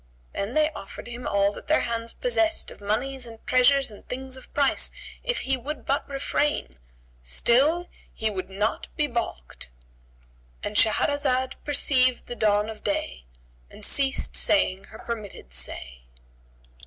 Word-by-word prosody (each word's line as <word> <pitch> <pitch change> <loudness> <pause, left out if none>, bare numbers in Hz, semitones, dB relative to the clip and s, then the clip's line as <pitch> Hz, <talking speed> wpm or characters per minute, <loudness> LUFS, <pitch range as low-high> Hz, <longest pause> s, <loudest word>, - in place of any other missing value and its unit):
Then 200 +5 -3
they 310 0 +4
offered 195 -9 -9
him 240 +1 -6
all 200 0 +3
that - - -10
their 310 - +4
hands 230 -1 -2
possessed 335 -10 +1
of - - -13
monies 245 +5 -1
and 225 -1 -10
treasures 255 0 +4
and 205 - -13
things 260 +1 -3
of 260 - -12
price, 280 -2 +2 0.3
if - - 0
he 265 0 +1
would 270 +1 -6
but 280 +1 0
refrain; 275 - -1 0.4
still 270 - +3 0.2
he 220 - -2
would 195 -3 -3
not 205 +4 -1
be 300 - +2
baulked,—And - - -8
Shahrazad 260 +3 +2
perceived 255 -3 +3
the 240 - -5
dawn 210 -2 +2
of 220 -1 -8
day 65 - -2 0.4
and - - -5
ceased 275 -1 +1
saying 195 -10 +3
her 220 - -12
permitted 210 - -6
say. 60 0 -2
235 Hz, 140 wpm, -26 LUFS, 195-270 Hz, 0.4 s, they